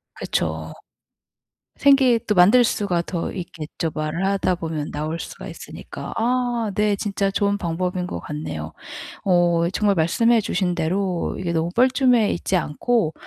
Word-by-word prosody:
그쵸. - - -2 1.0
생계 270 -4 +5
또 210 - +1
만들 205 +8 +6
수가 200 -6 0
더 170 0 -4
있겠죠 165 -2 -5
말을 155 +4 -2
하다 195 -2 +1
보면 160 -3 -4
나올 155 +3 -3
수가 - - -8
있으니까. - - -8
아 240 -2 0
네, 210 0 +2
진짜 200 -1 -1
좋은 200 +1 +1
방법인 180 0 -2
것 - - -5
같네요. 80 - -5 0.5
어 175 -2 +3
정말 205 0 +2
말씀해 225 +8 +3
주신 185 -3 -1
대로 180 +2 -1
이게 175 -2 -2
너무 165 +1 0
뻘쭘해 250 -3 +4
있지 185 - -1
않고 170 +2 0
185 Hz, 275 characters per minute, -22 LUFS, 165-215 Hz, 1.0 s, 만들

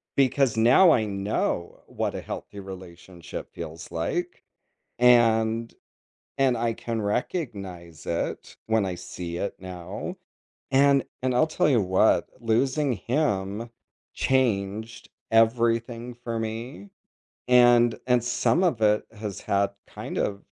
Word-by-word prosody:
Because 135 -3 +3
now 125 +11 +6
I 110 -6 +3
know 100 -3 -2
what - - -3
a - - -4
healthy 100 - -7
relationship 90 -2 -9
feels 80 +1 -8
like, 170 - -3 0.6
and 115 -2 +4 0.6
and 130 -2 +3
I 115 0 0
can 115 0 -4
recognize 100 - -4
it 85 - -3
when 110 -2 +2
I 95 -2 -3
see 85 -1 -6
it 100 - -3
now. 95 - -7 0.5
And 140 0 +4 0.2
and 130 -1 0
I'll 140 +6 +4
tell 155 - +1
you 130 -6 +4
what, 95 +3 +3
losing 130 +5 +1
him 110 - -1 0.4
changed 110 -3 -1 0.2
everything 115 +1 +2
for 120 -1 -5
me, 110 -3 -6 0.6
and 120 -1 +6
and 125 -2 +4
some 125 +6 +2
of 155 -11 +1
it 105 0 +3
has 105 -3 -6
had 100 0 +1 0.2
kind - - -6
of 100 0 -2
115 Hz, 125 wpm, -26 LUFS, 100-125 Hz, 0.6 s, now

